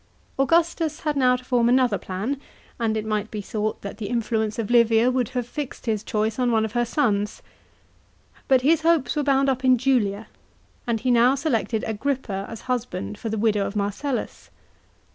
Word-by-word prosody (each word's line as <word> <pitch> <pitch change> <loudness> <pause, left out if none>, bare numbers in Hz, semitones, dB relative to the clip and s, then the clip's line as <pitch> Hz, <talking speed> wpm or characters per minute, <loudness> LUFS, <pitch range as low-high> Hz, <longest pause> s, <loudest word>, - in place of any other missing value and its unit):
§ - - -36 0.3
5. 270 - +3
Augustus 330 0 +1
had 300 -2 -1
now 255 -2 +4
to 250 0 -8
form 240 -2 +2
another 250 -5 +3
plan, 220 +10 -4 0.4
and 220 -2 0
it 215 - -3
might 215 0 -2
be 215 - -5
thought 215 +1 -3
that 200 +1 -7
the 210 - -4
influence 220 -2 -1
of 230 -1 -3
Livia 235 0 +4
would 250 -2 0
have 245 - -1
fixed 275 +2 -6
his 215 -3 -1
choice 215 +2 -1
on 250 -1 +2
one 220 -1 +2
of 220 - -5
her 240 +1 +1
sons. 215 -6 0 1.0
But 260 -2 +4
his 315 +4 +3
hopes 320 -6 +2
were 300 - +1
bound 275 -1 +2
up 260 -1 0
in 255 -1 +5
Julia, 225 -5 +1 0.6
and 230 -2 0
he 255 - +1
now 245 +2 +5
selected 230 - -1
Agrippa 220 -3 -2
as 225 -1 -8
husband 240 - -3
for 225 - -4
the 220 - -2
widow 210 -1 +2
of 200 - -7
Marcellus. 210 +7 -3
235 Hz, 195 wpm, -24 LUFS, 215-265 Hz, 1.0 s, in